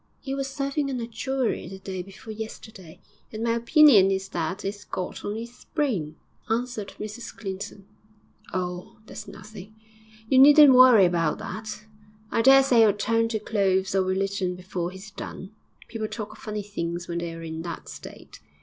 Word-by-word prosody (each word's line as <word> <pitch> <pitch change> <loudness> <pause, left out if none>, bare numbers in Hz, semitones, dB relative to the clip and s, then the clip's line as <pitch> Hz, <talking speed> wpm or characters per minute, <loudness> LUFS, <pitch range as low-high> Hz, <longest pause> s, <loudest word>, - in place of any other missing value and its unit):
''E 270 0 -2
was 275 -1 -2
serving 275 +1 -2
on 260 -2 -3
a 230 - -3
jury 255 -2 -2
the 190 +2 -8
day 190 -1 -6
before 195 +4 -10
yesterday, 215 -5 -9 0.3
and 220 +1 -5
my 230 - +1
opinion 235 - +6
is 195 0 -2
that 175 +3 -3
it's 200 +1 -4
got 180 - -5
on 205 +1 -3
'is 235 +2 -9
brain,' 205 - -1 0.3
answered 225 -3 -2
Mrs 215 +2 -7
Clinton. 195 -2 -7 0.7
'Oh, 180 -1 -4
that's - - -9
nothing. 210 +1 -11 0.5
You 260 +3 +4
needn't 290 0 +9
worry 250 -6 +8
about 170 -3 +1
that. 215 0 -7 0.5
I - - +2
daresay 270 -1 +6
it'll 215 -2 +5
turn 230 +2 +1
to 225 -1 -2
clothes 190 -3 0
or 195 - +3
religion 190 0 -1
before 180 -1 -4
he's 190 +3 -11
done. 190 0 -8 0.4
People 220 -2 -4
talk 215 -1 -6
of - - -14
funny 210 -1 -5
things 175 -4 -4
when 170 0 -3
they're 165 -1 -6
in 160 0 -5
that 170 0 -7
state. - - -11
210 Hz, 165 wpm, -25 LUFS, 185-235 Hz, 0.7 s, needn't